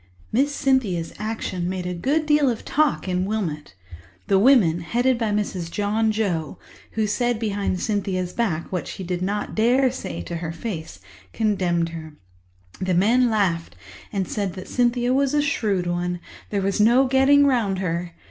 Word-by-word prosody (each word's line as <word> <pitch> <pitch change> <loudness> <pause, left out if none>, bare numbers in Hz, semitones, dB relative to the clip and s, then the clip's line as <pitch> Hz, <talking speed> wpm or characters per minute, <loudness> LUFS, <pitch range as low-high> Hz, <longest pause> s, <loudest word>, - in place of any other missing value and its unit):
Miss 275 +6 +2
Cynthia's 230 -13 0
Action 210 -5 -3
made 185 -1 -3
a 180 - -2
good 280 - 0
deal 295 -2 +4
of 230 - -4
talk 300 -8 +1
in 180 0 0
Wilmot. 175 - -3 0.5
The 195 - +3
women, 205 -9 +5
headed 240 +8 +1
by 225 -2 0
Mrs. 200 -5 -2
John 210 +4 0
Joe—who 205 +1 -3
said 240 +3 0
behind 205 -4 -1
Cynthia's 190 -4 -2
back 185 -9 -2
what 180 -2 -3
she 190 - -6
did 180 0 -3
not 205 +3 -2
dare 250 +4 +3
say 85 - -6
to 170 - -5
her 165 -1 -4
face—condemned 175 0 -3
her. 160 -2 -8 0.7
The 185 -1 +1
men 235 +7 +4
laughed 185 -7 0 0.4
and 195 -3 -1
said 200 -4 -2
that 185 - -8
Cynthia 245 0 +1
was 275 +1 +2
a 295 - +4
shrewd 210 -10 0
one; 175 0 -2 0.3
there 200 -2 -1
was 195 +1 0
no 240 +5 +5
getting 270 +2 +5
round 230 -8 +1
her. 170 -2 -3
205 Hz, 160 wpm, -23 LUFS, 180-240 Hz, 0.7 s, women